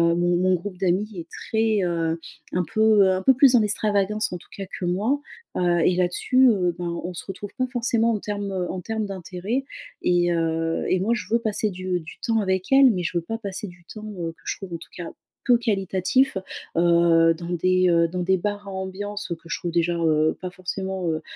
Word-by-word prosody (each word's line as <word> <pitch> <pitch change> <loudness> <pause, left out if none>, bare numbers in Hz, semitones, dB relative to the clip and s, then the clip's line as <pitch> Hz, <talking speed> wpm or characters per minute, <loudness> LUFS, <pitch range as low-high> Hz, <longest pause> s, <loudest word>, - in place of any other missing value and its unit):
mon 175 0 +2
mon 185 0 +3
groupe 180 +2 -6
d'amies 190 +3 +1
est 165 - -8
très, 220 -3 0
heu, 165 -1 -1 0.3
un 180 - +1
peu, 220 -2 +5
heu, 190 - +4
un 185 - -1
peu 265 +5 +5
plus 265 -2 +6
en 230 - +6
extravagance 210 -1 +1
en - - -3
tout - - -19
cas 195 - -5
que 180 - -2
moi. 210 +11 +1 0.4
Heu, 175 -1 +2
et 180 - +3
là-dessus, 220 +9 +3
heu, 180 -5 +1
bah, 175 - -3
on 170 +1 -4
se 170 - -7
retrouve 195 +1 -7
pas 255 0 0
forcément 235 -2 +1
en 210 - -1
termes, 205 -1 -4
heu, 185 -2 -2
en 185 - -5
termes 220 +2 -3
d'intérêt 195 +6 -3 0.4
et, 175 -1 +2
heu, 165 0 0
et 185 - +2
moi 220 +5 +1
je 225 - -3
veux 230 - +4
passer 215 -2 -1
du 185 -1 -2
du 160 - -11
temps 225 -1 +2
avec 190 +1 -1
elles, 270 -1 +7
mais 180 -4 -2
je 175 - -3
veux 170 - -1
pas 225 +6 -4
passer 200 -1 -5
du 175 -1 -15
temps, 215 -1 -8
heu, 165 -1 -2
que - - -28
je - - -2
trouve 190 -3 -8
en - - -2
tout 165 - -14
cas 175 -2 -6 0.4
peu 245 -2 +5
qualitatif. 200 +2 +1 0.4
Heu, 170 -1 +5
dans 170 +1 -8
des, 185 +1 +2
heu, 170 -1 +4
dans 180 +1 -4
des 190 +1 +2
bars 205 +2 -3
à - - -6
ambiance, 190 +1 -5
heu, - - 0
que 165 +1 -17
je - - -1
trouve 175 - -3
déjà, 170 0 +1
heu, 155 -1 +2
pas 185 -1 -5
forcément, 185 0 -4
heu 160 0 -1
185 Hz, 230 wpm, -24 LUFS, 175-210 Hz, 0.4 s, elles